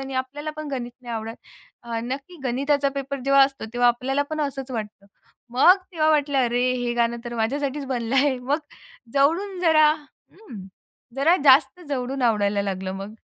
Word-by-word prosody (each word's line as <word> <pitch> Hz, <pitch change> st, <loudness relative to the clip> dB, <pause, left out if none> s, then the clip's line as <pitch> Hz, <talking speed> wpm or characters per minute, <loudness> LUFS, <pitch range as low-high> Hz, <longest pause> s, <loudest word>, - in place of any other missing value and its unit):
आणि 270 Hz, 0 st, -6 dB
आपल्याला 290 Hz, +4 st, -7 dB
पण 310 Hz, -1 st, -6 dB
गणित 245 Hz, -3 st, -4 dB
नाही 240 Hz, -2 st, -6 dB
आवडत." 225 Hz, +1 st, -5 dB, 0.5 s
अ, 235 Hz, -1 st, -4 dB
नक्की 275 Hz, +8 st, -6 dB
गणिताचा 280 Hz, +3 st, +1 dB
पेपर 275 Hz, 0 st, -4 dB
जेव्हा 275 Hz, 0 st, +6 dB
असतो 270 Hz, -3 st, -5 dB
तेव्हा 245 Hz, 0 st, +3 dB
आपल्याला 260 Hz, +4 st, 0 dB
पण 310 Hz, 0 st, -2 dB
असंच 275 Hz, -2 st, -4 dB
वाटतं. 210 Hz, -4 st, -6 dB, 0.5 s
मग 340 Hz, +9 st, +6 dB, 0.2 s
तेव्हा 310 Hz, -2 st, +1 dB
वाटलं 290 Hz, -2 st, +2 dB
अरे 245 Hz, 0 st, +2 dB
हे 245 Hz, -1 st, -2 dB
गाणं 235 Hz, 0 st, +1 dB
तर 240 Hz, 0 st, -6 dB
माझ्यासाठीच 275 Hz, +5 st, -2 dB
बनलं 245 Hz, -2 st, -2 dB
आहे. 270 Hz, -1 st, +3 dB
मग 270 Hz, +4 st, -1 dB, 0.5 s
जवळून 340 Hz, +8 st, +1 dB
जरा 315 Hz, -3 st, +5 dB
हं. 290 Hz, -, -13 dB, 0.5 s
जरा 315 Hz, +6 st, +4 dB
जास्त 280 Hz, +5 st, +5 dB
जवळून 265 Hz, -1 st, -3 dB
आवडायला 205 Hz, -3 st, +2 dB
लागलं 190 Hz, -1 st, -3 dB
मग. 195 Hz, +2 st, -7 dB
265 Hz, 165 wpm, -23 LUFS, 240-285 Hz, 0.5 s, जेव्हा